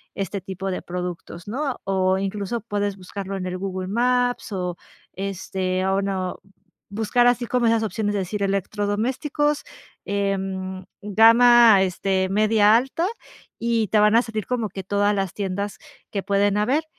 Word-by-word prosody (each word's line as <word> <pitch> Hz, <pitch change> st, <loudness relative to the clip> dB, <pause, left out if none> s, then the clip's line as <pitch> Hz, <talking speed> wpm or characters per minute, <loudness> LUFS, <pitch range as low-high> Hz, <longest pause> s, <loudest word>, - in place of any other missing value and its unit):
este 195 Hz, 0 st, -3 dB
tipo 190 Hz, +1 st, -5 dB
de 185 Hz, -, -3 dB
productos, 180 Hz, 0 st, -6 dB
¿no?, 265 Hz, +4 st, -3 dB
o 190 Hz, -1 st, +1 dB
incluso 200 Hz, +3 st, -3 dB
puedes 205 Hz, -2 st, -2 dB
buscarlo 195 Hz, +1 st, -6 dB
en 185 Hz, -, -4 dB
el 185 Hz, 0 st, -3 dB
Google 185 Hz, -1 st, -4 dB
Maps 245 Hz, +2 st, +1 dB
o, 180 Hz, -2 st, -2 dB, 0.4 s
este, 185 Hz, -1 st, -2 dB
o 195 Hz, +1 st, +1 dB
no 190 Hz, -2 st, -2 dB, 0.5 s
buscar 225 Hz, +4 st, +2 dB
así 245 Hz, 0 st, +2 dB
como 240 Hz, 0 st, +1 dB
esas 225 Hz, -1 st, +2 dB
opciones, 215 Hz, -1 st, -2 dB
es 200 Hz, -, 0 dB
decir, 200 Hz, +3 st, -4 dB
electrodomésticos, 215 Hz, -, -1 dB, 0.4 s
em, 190 Hz, -2 st, -2 dB, 0.2 s
gama, 230 Hz, 0 st, +7 dB
este, 190 Hz, 0 st, 0 dB
media 215 Hz, +1 st, +4 dB
alta, 270 Hz, +8 st, +1 dB, 0.5 s
y 230 Hz, -3 st, 0 dB
te 215 Hz, -, +3 dB
van 210 Hz, +1 st, +5 dB
a 235 Hz, -, +5 dB
salir 220 Hz, -2 st, -5 dB
como 235 Hz, -4 st, -1 dB
que 190 Hz, +1 st, -7 dB
todas 205 Hz, +2 st, +1 dB
las 195 Hz, -3 st, -2 dB
tiendas 200 Hz, 0 st, -3 dB, 0.3 s
que 200 Hz, -2 st, -3 dB
pueden 200 Hz, 0 st, +2 dB
haber. 270 Hz, +10 st, +1 dB
200 Hz, 150 wpm, -23 LUFS, 190-225 Hz, 0.5 s, gama